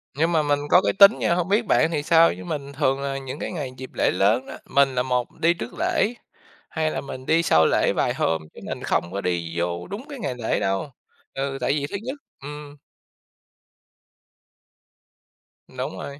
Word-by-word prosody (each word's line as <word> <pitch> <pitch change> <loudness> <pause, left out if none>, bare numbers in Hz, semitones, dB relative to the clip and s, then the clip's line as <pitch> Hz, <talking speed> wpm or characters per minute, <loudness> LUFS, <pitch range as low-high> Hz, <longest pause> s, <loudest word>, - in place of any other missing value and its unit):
Nhưng 165 +4 +1
mà 160 - +3
mình 145 0 +1
có 180 - +7
cái - - +1
tính 200 +2 +7
nha, - - +2
hông 180 0 -1
biết 215 +3 +2
bạn 165 - +3
thì 150 -3 -1
sao, 165 +1 +5
chứ 90 - -9
mình 140 +5 -5
thường 135 0 +1
là 135 0 -2
những 135 +2 -7
cái - - -4
ngày 145 -7 -4
dịp 130 0 -8
lễ - - +2
lớn 105 +7 +2
á, - - -8
mình 140 -2 +2
là 125 - +1
một 125 -2 -1
đi 170 +1 +4
trước 120 -8 -7
lễ, 225 - +1 0.6
hai 160 -1 -1
là - - -3
mình 130 -2 -8
đi 165 +3 +3
sau 80 - +4
lễ - - +2
vài - - +1
hôm, 80 -1 0
chứ - - -12
mình - - -5
không 85 - 0
có 100 - -2
đi 85 -2 -2
vô 85 0 -2
đúng 205 +7 -7
cái 280 - -7
ngày 135 - -3
lễ 115 -2 -1
đâu 95 +9 -1 0.4
ừ, 135 0 -3
tại 135 - +1
vì 145 -1 -1
thứ - - -5
nhất 260 +4 -4 0.3
ừm. 145 0 -9 2.9
Đúng - - -5
rồi. 140 0 -7
140 Hz, 210 wpm, -24 LUFS, 125-165 Hz, 2.9 s, có